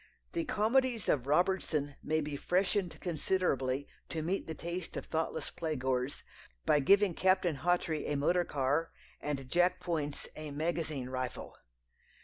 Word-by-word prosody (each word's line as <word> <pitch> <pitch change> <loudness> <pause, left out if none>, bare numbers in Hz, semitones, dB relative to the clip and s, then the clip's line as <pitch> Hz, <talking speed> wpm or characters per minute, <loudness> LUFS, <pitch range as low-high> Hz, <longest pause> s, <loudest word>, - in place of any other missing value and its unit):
The 335 -1 -1
comedies 240 0 +2
of 135 -3 +2
Robertson 155 -3 +1
may 155 +1 +1
be 150 -1 -3
"freshened" 185 +3 0
considerably 145 -6 0 0.2
to 160 -2 -2
meet 185 +5 -1
the 160 - -4
taste 170 +1 -5
of - - -4
thoughtless 160 0 -2
play 160 -2 -2
goers, 130 0 -1 0.4
by 150 - +5
giving 195 +6 +5
Captain 185 -4 +2
Hawtrey 170 -1 +1
a 150 - 0
motor 175 +5 +3
car 145 +2 0 0.3
and 140 -3 -3
Jack 175 +5 +3
Poyntz 155 -5 -2
a 155 -1 -6
magazine 155 -3 -2
rifle. 130 -2 -4
160 Hz, 140 wpm, -33 LUFS, 145-180 Hz, 0.4 s, by